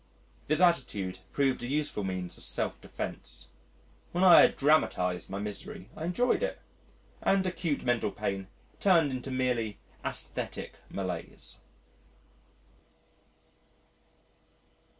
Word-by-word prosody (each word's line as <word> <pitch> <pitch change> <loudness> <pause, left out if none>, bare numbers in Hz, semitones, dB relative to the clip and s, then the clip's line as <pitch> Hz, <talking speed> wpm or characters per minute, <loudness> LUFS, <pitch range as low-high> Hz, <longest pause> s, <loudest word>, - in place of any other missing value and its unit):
This 155 +4 +2
attitude 100 - +2
proved 135 -3 +1
a 120 - -3
useful 145 -6 -1
means 95 -2 -3
of - - -13
self - - -2
defence. - - -6 0.6
When 175 +2 +2
I 180 -2 +10
had - - +5
dramatised 90 - +2
my 95 - -3
misery, 180 - -6
I 160 - -4
enjoyed 240 - +2
it, - - -1 0.6
and 195 -1 +3
acute 175 -5 -1
mental 120 -4 +1
pain 100 -1 -3 0.3
turned 170 -7 +5
into 130 +1 -4
merely 125 -5 0 0.3
aesthetic - - -5
malaise. 90 -4 -5
130 Hz, 110 wpm, -30 LUFS, -, 0.6 s, I